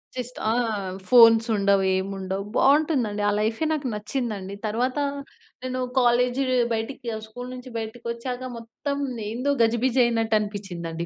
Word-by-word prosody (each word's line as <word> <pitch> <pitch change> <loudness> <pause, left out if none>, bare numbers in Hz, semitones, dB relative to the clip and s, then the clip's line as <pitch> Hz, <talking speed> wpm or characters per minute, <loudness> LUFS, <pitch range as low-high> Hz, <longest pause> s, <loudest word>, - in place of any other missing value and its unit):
Just 250 -1 -5
ఆ! - - +3 0.6
Phones 230 -1 +7
ఉండవు. 200 -1 +3
ఏమి 190 +1 -2
ఉండవు. 190 +1 -3
బావుంటుందండి. 275 -7 +3
ఆ - - +2
లైఫే 225 +8 0
నాకు 300 -4 -1
నచ్చిందండి. 210 -3 -3
తర్వాత 245 +4 -1 0.7
నేను 255 0 -3 0.2
కాలేజ్ 245 +1 +3 0.3
బయటికి 235 +2 -4 0.2
స్కూల్ 245 +3 -8
నుంచి 255 0 -9
బయటికొచ్చాక 235 +3 -5
మొత్తం 230 +5 -5 0.3
ఏందో 250 +6 -1
గజిబిజి 235 +3 +2
అయినట్టు 225 -2 +1
అనిపించ్చిందండి. 175 -5 -5
230 Hz, 125 wpm, -25 LUFS, 210-255 Hz, 0.7 s, Phones